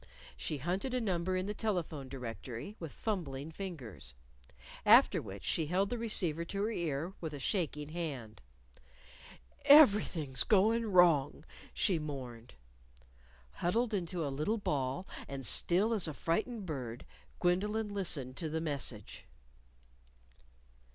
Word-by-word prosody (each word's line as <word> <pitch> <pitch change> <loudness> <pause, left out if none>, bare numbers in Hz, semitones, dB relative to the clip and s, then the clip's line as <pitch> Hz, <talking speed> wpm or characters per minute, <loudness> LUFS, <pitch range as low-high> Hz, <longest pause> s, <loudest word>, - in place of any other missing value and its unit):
She 150 - -3
hunted 185 - -2
a - - +2
number 185 -4 -1
in 185 - -1
the 205 - -3
telephone 170 - -3
directory 125 - -7
with 165 -4 -6
fumbling 160 -9 -4
fingers. 135 - -8 0.7
After - - +6
which 95 -2 -9
she 160 -3 0
held 190 +4 +1
the 245 - -1
receiver 175 -8 0
to 200 +4 -3
her 220 - 0
ear 165 -2 -2
with 160 -3 -4
a - - -7
shaking 150 -2 -1
hand. 135 - -5 1.2
"Everything's 200 - +6
goin' 220 +2 +3
wrong," 165 -5 +4 0.3
she 185 -6 +1
mourned. 125 - -7 1.0
Huddled 220 - 0
into 175 -4 -2
a 140 - -3
little 155 +11 0
ball, 145 -2 -2 0.2
and 135 -1 -6
still 195 - +4
as 200 -6 +3
a 155 - -5
frightened 215 +5 -2
bird, 125 -7 -5 0.3
Gwendolyn 210 +5 +1
listened 145 -10 -1
to 160 - -2
the 160 +1 -2
message. 140 -9 -4
170 Hz, 130 wpm, -33 LUFS, 140-200 Hz, 1.2 s, After